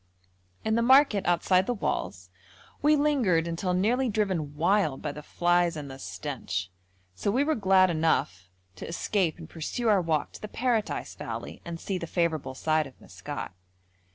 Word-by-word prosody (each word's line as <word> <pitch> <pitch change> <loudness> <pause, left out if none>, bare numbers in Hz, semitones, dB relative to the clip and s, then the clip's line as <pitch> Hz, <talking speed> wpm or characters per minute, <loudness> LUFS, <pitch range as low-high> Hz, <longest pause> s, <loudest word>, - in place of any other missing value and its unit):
In 220 - +1
the 230 - +3
market 260 -4 +5
outside 180 +2 +3
the 245 - 0
walls 90 - -3 0.5
we 300 +1 +5
lingered 250 - +2
until 180 +2 -1
nearly 240 +7 +2
driven 185 -9 -1
wild 165 -3 +2
by 150 - -2
the 150 - -8
flies 175 +1 +1
and 145 -2 -6
the 135 - -10
stench, 115 -12 -4 0.4
so 90 - -2
we 255 +7 +2
were 315 +2 +1
glad 190 -5 +4
enough 95 - 0 0.3
to - - -7
escape 170 0 0
and 165 -2 -10
pursue 195 +9 -2
our 200 -3 +4
walk 160 -3 -1
to - - -12
the 215 - -5
Paradise 230 -1 -1
valley - - -7
and 170 -1 -6
see 190 +1 -3
the 170 - -5
favourable 160 -6 -1
side 155 +1 +1
of 130 - -17
Maskat. - - -7
175 Hz, 170 wpm, -28 LUFS, 155-215 Hz, 0.5 s, market